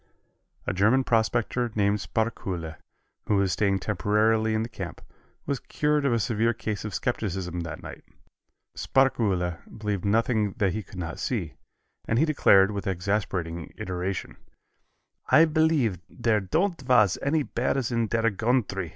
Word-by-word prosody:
A -, -, -1 dB
German 110 Hz, +8 st, +3 dB
prospector 120 Hz, +1 st, +1 dB
named 105 Hz, 0 st, +2 dB
Sparkuhle, 95 Hz, -8 st, -3 dB, 0.5 s
who 105 Hz, -, +2 dB
was 100 Hz, -2 st, +2 dB
staying 100 Hz, +2 st, +1 dB
temporarily 110 Hz, +2 st, +1 dB
in 110 Hz, -, 0 dB
the -, -, -4 dB
camp, 100 Hz, -6 st, -7 dB, 0.5 s
was 140 Hz, -2 st, -1 dB
cured 150 Hz, -1 st, 0 dB
of -, -, +2 dB
a 115 Hz, -, +2 dB
severe 115 Hz, +1 st, +1 dB
case 110 Hz, -2 st, -4 dB
of 105 Hz, -3 st, -5 dB
skepticism 90 Hz, -5 st, -2 dB
that 85 Hz, -2 st, -6 dB
night. -, -, -9 dB, 0.7 s
Sparkuhle 100 Hz, -10 st, +1 dB, 0.2 s
believed 105 Hz, -3 st, -2 dB
nothing 110 Hz, -1 st, +1 dB
that 95 Hz, -4 st, 0 dB
he 110 Hz, -, -2 dB
could 95 Hz, -1 st, -13 dB
not 85 Hz, -2 st, -5 dB
see, 95 Hz, -, -2 dB, 0.5 s
and 115 Hz, -, +1 dB
he 150 Hz, -, +4 dB
declared, 100 Hz, -10 st, +5 dB
with 100 Hz, 0 st, -4 dB
exasperating 90 Hz, -3 st, -2 dB
iteration, 90 Hz, +1 st, -4 dB, 0.9 s
"I 160 Hz, -, +7 dB
believe 155 Hz, -, +2 dB
there 115 Hz, -3 st, +1 dB
don't 165 Hz, -, 0 dB
vas 120 Hz, -7 st, +3 dB
any 150 Hz, +2 st, +1 dB
bears 130 Hz, 0 st, -1 dB
in 115 Hz, -1 st, +1 dB
der 115 Hz, +1 st, +1 dB
gountry. 105 Hz, -4 st, 0 dB
110 Hz, 145 wpm, -26 LUFS, 95-120 Hz, 0.9 s, I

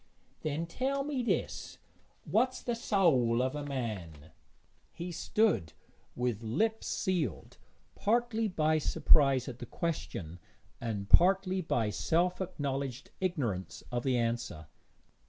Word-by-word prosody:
'Then 155 Hz, +2 st, -1 dB
tell 270 Hz, +10 st, -1 dB
me 280 Hz, -2 st, -1 dB
this 240 Hz, -, -2 dB, 0.5 s
What's 255 Hz, +3 st, +1 dB
the 240 Hz, -, -1 dB
soäl 165 Hz, -, +3 dB
o' 130 Hz, +3 st, 0 dB
a -, -, -4 dB
man?' 95 Hz, -, -5 dB, 0.6 s
He 175 Hz, +1 st, -6 dB
stood 165 Hz, -, +1 dB, 0.4 s
with 125 Hz, -3 st, -1 dB
lips 220 Hz, -, 0 dB
sealed, 165 Hz, -, -2 dB, 0.3 s
partly 225 Hz, 0 st, +1 dB
by 155 Hz, -4 st, +2 dB
surprise 140 Hz, -4 st, +4 dB
at 125 Hz, -2 st, -7 dB
the 120 Hz, -, -7 dB
question, 95 Hz, -, -4 dB, 0.4 s
and 105 Hz, -4 st, -3 dB
partly 190 Hz, -, +5 dB
by 115 Hz, -10 st, 0 dB
self 170 Hz, -, +1 dB
acknowledged 140 Hz, -6 st, -3 dB
ignorance 130 Hz, -, -2 dB
of 120 Hz, 0 st, 0 dB
the 130 Hz, -1 st, +1 dB
answer. 115 Hz, -9 st, -2 dB
145 Hz, 120 wpm, -31 LUFS, 115-190 Hz, 0.6 s, partly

